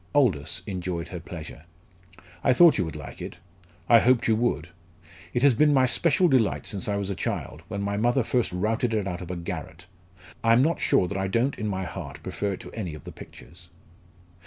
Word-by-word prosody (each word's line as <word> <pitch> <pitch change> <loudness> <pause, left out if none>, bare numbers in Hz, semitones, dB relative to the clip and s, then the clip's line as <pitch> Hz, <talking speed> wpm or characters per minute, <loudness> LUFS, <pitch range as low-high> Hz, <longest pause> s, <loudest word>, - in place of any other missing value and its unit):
Aldous 105 - +2
enjoyed 90 -3 -4
her 90 - -6
pleasure. 80 -3 -9 0.8
"I 130 - +5
thought 165 0 +6
you - - +1
would 80 - -6
like 75 -2 -9
it; - - -7 0.5
I 115 - +7
hoped 125 +1 +3
you 110 - +4
would. 90 -9 -1 0.6
It 120 - -1
has 140 -2 +6
been 150 +4 +4
my 130 -1 +5
special 150 +8 +3
delight 130 -9 +2
since 100 -3 -3
I 105 - 0
was 100 -1 -2
a - - -3
child, 80 - -4
when 100 -1 -4
my 100 0 -1
mother 120 +4 +2
first 120 +1 0
routed 110 +5 0
it 105 -3 0
out 90 -1 -4
of 90 - -8
a 90 - -3
garret. 85 -1 -6 0.6
I 115 0 +5
am 125 +3 +5
not 165 +3 +1
sure 90 - +3
that 100 +1 -3
I 95 - -1
don't 115 +8 +1
in 110 - -2
my 95 -2 -2
heart - - -7
prefer 100 -1 -2
it - - -7
to - - -10
any 90 -8 -5
of 75 - -12
the - - -8
pictures." 85 +3 -14
100 Hz, 215 wpm, -26 LUFS, 90-120 Hz, 0.8 s, I